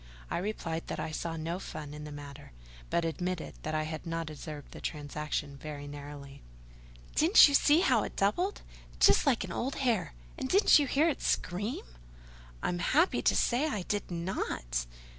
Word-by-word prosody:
I - - 0
replied 170 -4 -3
that - - -4
I - - -3
saw 165 +1 -3
no 165 +3 -3
fun 150 -5 -7
in 150 0 -7
the 150 - -8
matter; 145 - -10 0.4
but 170 - +1
admitted 180 +1 -3
that 155 0 -3
I 155 - +1
had 155 +1 -5
not 165 -1 -3
observed 150 -1 -8
the - - -10
transaction 150 -1 -4
very 145 0 -7
narrowly. 145 -1 -9 0.7
"Didn't 330 +5 +8
you 285 - -1
see 295 +3 +5
how 250 - +4
it - - -5
doubled—just 330 - +1
like 250 -6 +3
an 190 - -6
old 260 +9 -2
hare? 235 - 0 0.2
and 260 - -3
didn't 395 -4 +6
you 285 - +1
hear 295 +5 +3
it 315 - -1
scream?" 205 +7 -1 0.8
"I'm 175 - 0
happy 310 - +3
to - - +3
say 250 +6 +2
I 210 - -2
did 205 +3 -2
not." 60 - -2
170 Hz, 175 wpm, -31 LUFS, 150-235 Hz, 0.8 s, Didn't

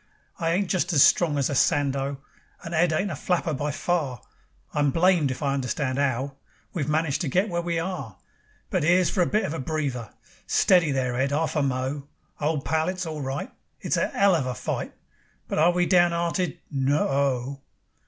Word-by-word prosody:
I 165 - 0
ain't 195 +2 +1
just 180 0 0
as 140 - +7
strong 160 -5 +4
as 140 - +1
a - - -3
Sandow, 140 0 +1 0.4
And 165 - -6
Ed 170 +1 +3
ain't 180 +5 0
a - - -3
flapper 170 +1 -1
by 145 +2 -2
far; 145 -4 -1 0.5
I'm 145 -1 +2
blamed 165 -1 +3
if 130 +2 -4
I 140 -1 +1
understand 135 0 -1
'ow 135 0 -1 0.4
We've 155 -5 -2
managed 155 0 0
to 170 - -1
get 185 +10 +1
where 170 -1 -1
we 170 -1 -2
are. 165 - -4 0.5
But - - +1
'ere's 175 +1 +4
for 185 - +1
a 175 - +3
bit 215 -1 +1
of 155 - -3
a 165 - -4
breather. 135 -5 -3 0.4
"Steady 175 -5 +4
there, 130 -2 -1
Ed, 135 +2 +1
'arf 155 +1 0
a 150 - +2
mo'. 135 +1 -2 0.3
Old 150 -1 -1
pal, 160 +3 +1
it's 185 0 -3
all 155 -2 -5
right; 135 +1 -4 0.3
It's - - -1
a - - 0
'ell 200 -1 +5
of 150 -7 +1
a 125 - -3
fight, - - -4 0.5
But - - -1
are 165 +3 +5
we 175 0 +1
down 175 -1 +4
'earted? 170 +1 -1
No 140 +1 +1
o - - -3
o." 135 -1 0
150 Hz, 205 wpm, -25 LUFS, 135-175 Hz, 0.5 s, as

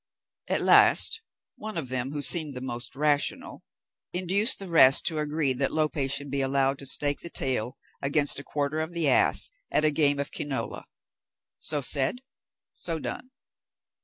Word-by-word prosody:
At - - -1
last, 450 - +5 0.4
one 215 -3 -7
of 140 -6 -4
them, 130 +1 -2
who 145 -1 -4
seemed 155 -5 +2
the - - -5
most 120 0 -6
rational, 145 0 -1 0.5
induced 190 +6 +2
the 195 - -8
rest 135 -6 +5
to 160 -2 0
agree 150 -2 0
that 135 +2 -1
Lope 155 -1 -1
should 140 0 -2
be 140 0 -1
allowed 135 0 0
to 140 - -6
stake 145 +2 0
the 170 - -8
tail 130 -4 -2 0.2
against 145 0 +1
a - - -9
quarter 145 +2 -3
of 160 +2 -4
the 170 -3 0
ass 135 - +2 0.2
at 155 - +1
a 155 - +3
game 145 -1 +3
of 140 - -4
quinola. 135 -6 -5 0.7
So 150 -2 -2
said, 140 - +2 0.5
so 165 -2 -3
done. 255 +10 -7
145 Hz, 165 wpm, -26 LUFS, 135-160 Hz, 0.7 s, last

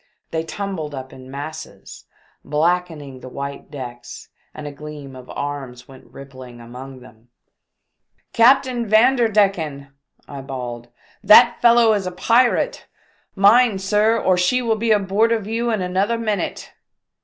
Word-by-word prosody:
They 160 - -1
tumbled 165 -4 -5
up 130 0 -8
in 130 0 -13
masses, 145 +3 -9 0.4
blackening 155 -3 -2
the 130 - -10
white 140 +2 -7
decks, 125 -4 -9 0.2
and 150 - -10
a 145 - -5
gleam 145 -2 -10
of 130 -1 -13
arms 135 -4 -6
went 135 -1 -15
rippling 130 -3 -12
among 125 +3 -11
them. 115 -1 -18 1.0
"Captain 245 0 +3
Vanderdecken!" 205 - +2 0.4
I 140 -1 -8
bawled, 120 -3 -7 0.4
"that 235 +4 +6
fellow 235 -2 +5
is 200 -3 -2
a - - -3
pirate! 240 - +1 0.5
Mind, 210 +1 +4
sir, 210 +4 +2
or 185 -3 +2
she 180 +8 +2
will 230 -3 0
be 225 +1 -2
aboard 210 +2 +2
of 225 -3 -1
you 230 +2 -2
in 215 -5 -1
another 195 +6 0
minute 215 -3 -3
180 Hz, 135 wpm, -20 LUFS, 135-220 Hz, 1.0 s, that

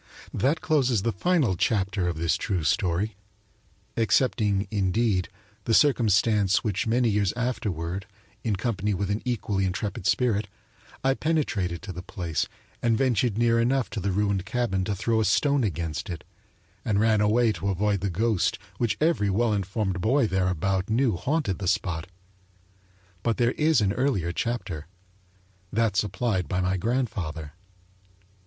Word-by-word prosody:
That 145 +6 +1
closes 130 - +2
the 115 - +1
final 135 - +1
chapter 95 -1 0
of 85 -2 -2
this 80 0 +1
true 90 -5 -2
story 90 +6 0 0.8
excepting, 105 -2 +2
indeed, 100 -1 +1 0.4
the 115 - +3
circumstance 105 -7 +3
that 105 -3 -1
many 120 +2 +2
years 100 -3 +1
afterward, 100 -7 -3 0.4
in 110 -3 0
company 105 -1 -1
with 100 +1 -2
an 105 - -1
equally 105 -5 -1
intrepid 95 0 -2
spirit, 110 -3 +1 0.6
I 135 0 +3
penetrated 115 - -1
to 95 - -6
the 90 - -6
place 85 -4 -3 0.3
and 115 -2 +2
ventured 120 -4 +1
near 115 0 +3
enough 125 +2 +1
to 110 - -3
the 100 +1 -1
ruined 100 -1 0
cabin 110 -4 -1
to 100 - -1
throw 110 +3 +1
a - - +2
stone 140 - +2
against 85 -1 -3
it, 85 - -5 0.6
and 100 -2 +1
ran 110 -1 +3
away 110 +2 +3
to 100 0 -3
avoid 100 +1 +1
the 100 +2 -1
ghost 105 +2 +1 0.2
which 120 -3 0
every 155 -11 +2
well 110 +3 +2
informed 95 -1 -2
boy 130 +5 +3
thereabout 95 0 0
knew 115 -1 +2
haunted 130 - -1
the 95 - -3
spot. 85 -3 -1 1.1
But 115 +1 0
there 120 0 +3
is 155 -2 +2
an 100 -1 +2
earlier 105 - 0
chapter 95 -7 -3 0.8
that 110 -2 +1
supplied 100 - 0
by 90 - -1
my 90 +1 +1
grandfather. 90 - -2
105 Hz, 150 wpm, -26 LUFS, 95-120 Hz, 1.1 s, the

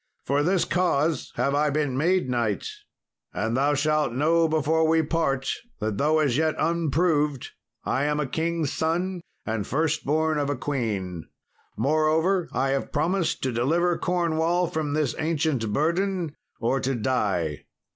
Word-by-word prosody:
For 140 +2 +1
this 180 +4 +2
cause 165 -3 0
have 140 - 0
I 150 +1 +2
been 145 -3 0
made 175 +3 +2
knight, 120 -5 -1 0.7
and 110 +2 -1
thou 145 +3 +2
shalt 150 -3 +1
know 165 +5 +3
before 160 +1 +2
we 160 0 +3
part 145 -4 0 0.3
that 105 -2 -2
though 155 +2 +3
as 140 -5 +2
yet 160 0 +1
unproved, 155 -3 +1 0.3
I 135 +3 0
am 150 0 0
a 150 - 0
king's 160 +1 -1
son 175 +3 -1 0.2
and 110 -2 -2
first 155 +3 0
born 155 +1 +1
of 145 -1 -1
a 145 - 0
queen. 105 - -3 0.5
Moreover 155 - +2
I 135 +1 0
have 135 0 -1
promised 170 +4 0
to 130 - 0
deliver 165 +9 +1
Cornwall 170 0 +1
from 155 -4 -2
this 150 -4 0
ancient 155 -8 0
burden, 170 - 0 0.3
or 125 +3 +1
to 135 +1 -1
die. 100 - -1
150 Hz, 150 wpm, -25 LUFS, 135-165 Hz, 0.7 s, know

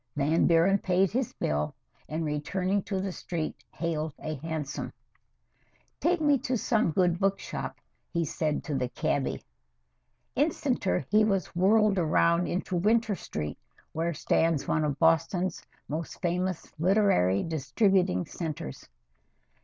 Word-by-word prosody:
Van 150 +3 +2
Buren 175 +4 +4
paid 185 0 +2
his 250 +2 -1
bill, 75 0 -1 0.3
and, 160 +1 -2
returning 180 +7 -1
to 190 0 -3
the 190 0 -2
street, 170 -3 -4
hailed 160 -3 -3
a 155 - -4
hansom. 155 -1 -4 1.1
"Take 350 +1 +2
me 290 -3 +3
to 255 0 -1
some 220 -4 +1
good 175 +1 +2
book 195 0 +2
shop," - - -5 0.3
he 170 -1 0
said 155 -1 -1
to 150 - -4
the 125 -2 -1
cabby. 145 -1 -1 0.9
Instanter 90 +8 0
he 215 +1 +5
was 195 -4 0
whirled 205 +2 +4
around 170 +1 +3
into 185 +1 -2
Winter 220 +4 +2
Street, 75 - -5 0.3
where 165 +2 -1
stands 160 0 +1
one 155 - +1
of 145 -2 -1
Boston's 165 +3 +2 0.2
most 155 +3 -5
famous 180 0 -2
literary 170 - +3
distributing 160 - +1
centers. 155 - -6
170 Hz, 130 wpm, -28 LUFS, 155-195 Hz, 1.1 s, he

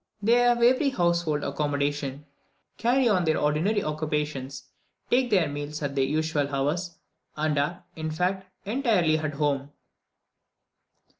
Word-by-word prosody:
They 210 +3 +1
have 240 -1 +3
every 260 +4 +4
household 170 - 0
accommodation, 145 -1 -2 0.5
carry 250 +2 +3
on 190 -5 +3
their 160 -1 +2
ordinary 165 +8 +1
occupations, 150 -3 -3 0.5
take 250 0 +3
their 185 -7 +3
meals 145 +1 -5
at 140 -1 -2
their 135 -1 +1
usual 155 0 0
hours, 150 +6 -2 0.4
and 155 0 0
are, 175 +6 -2
in 160 0 -4
fact, 185 +4 -1 0.2
entirely 205 - +2
at 155 -1 -3
home. 140 -1 -1
155 Hz, 130 wpm, -26 LUFS, 145-195 Hz, 0.5 s, every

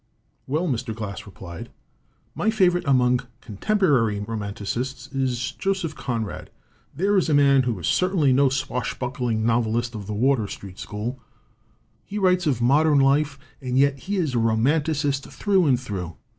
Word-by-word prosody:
"Well," 155 +6 0
Mr. 120 -5 -2
Glass 105 -2 -6
replied, 85 -3 -9 0.6
"my 215 - 0
favorite 180 -5 +2
among 125 -2 +3 0.2
contemporary 125 - +1
romanticists 115 +6 -4
is 130 -1 -1
Joseph 185 -1 -2
Conrad. 115 -6 -4 0.5
There 195 +6 +2
is 175 - -1
a 150 - +3
man 140 -1 +5
who 120 -4 -1
is 85 - -6
certainly 180 -7 +2
no 135 +1 +4
swashbuckling 125 -3 -2
novelist 115 0 +1
of 105 -3 -7
the 105 - -3
Wardour 120 -1 +2
Street 95 -2 -9
school. 115 +5 -5 0.8
He 205 - -6
writes 180 -3 +2
of 125 -5 +1
modern 145 +4 +4
life, 140 +1 +2 0.2
and 125 -1 -2
yet 140 0 +3
he 200 +7 -3
is 165 -8 0
a 120 - +1
romanticist 140 +5 +1
through 195 -5 +1
and 130 -3 +3
through. 95 -9 -5
130 Hz, 150 wpm, -24 LUFS, 115-150 Hz, 0.8 s, man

